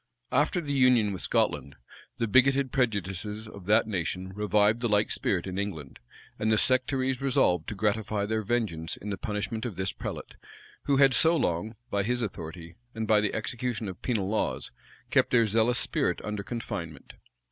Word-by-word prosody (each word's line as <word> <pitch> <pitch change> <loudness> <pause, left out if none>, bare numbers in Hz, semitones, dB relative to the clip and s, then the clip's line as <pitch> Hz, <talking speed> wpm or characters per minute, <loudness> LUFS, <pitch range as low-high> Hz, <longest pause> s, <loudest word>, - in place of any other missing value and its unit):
After 180 - +2
the 145 -3 -3
union 125 -6 +4
with 95 - -6
Scotland, 70 +1 0 0.4
the 115 - 0
bigoted 135 +3 +4
prejudices 105 -2 -1
of 100 -3 -11
that 110 +2 +4
nation 95 -2 -3
revived 105 +2 +2
the 120 - +1
like 105 0 +2
spirit 90 -3 0
in 95 0 -4
England; 80 -10 -5 0.4
and 110 +1 +1
the 110 - +4
sectaries 130 +1 +1
resolved 90 -11 +2
to - - -4
gratify 105 0 0
their 110 +1 -1
vengeance 100 -8 -2
in 105 - -6
the 100 - -3
punishment 105 +2 -3
of 120 -6 -4
this 95 0 -1
prelate, - - -7 0.5
who 140 - +2
had 135 -1 +6
so 165 +7 +4
long, 110 - -1 0.2
by 100 - +1
his 120 +4 0
authority, 85 -3 -7 0.2
and 110 -1 -3
by 105 -1 +4
the 105 - -1
execution 120 0 -3
of 95 -2 -7
penal 110 -7 -1
laws, 110 +2 -1 0.4
kept - - +4
their 120 -2 +4
zealous 115 +3 +2
spirit - - 0
under 105 -1 -3
confinement. 85 - -6
105 Hz, 175 wpm, -28 LUFS, 95-120 Hz, 0.5 s, had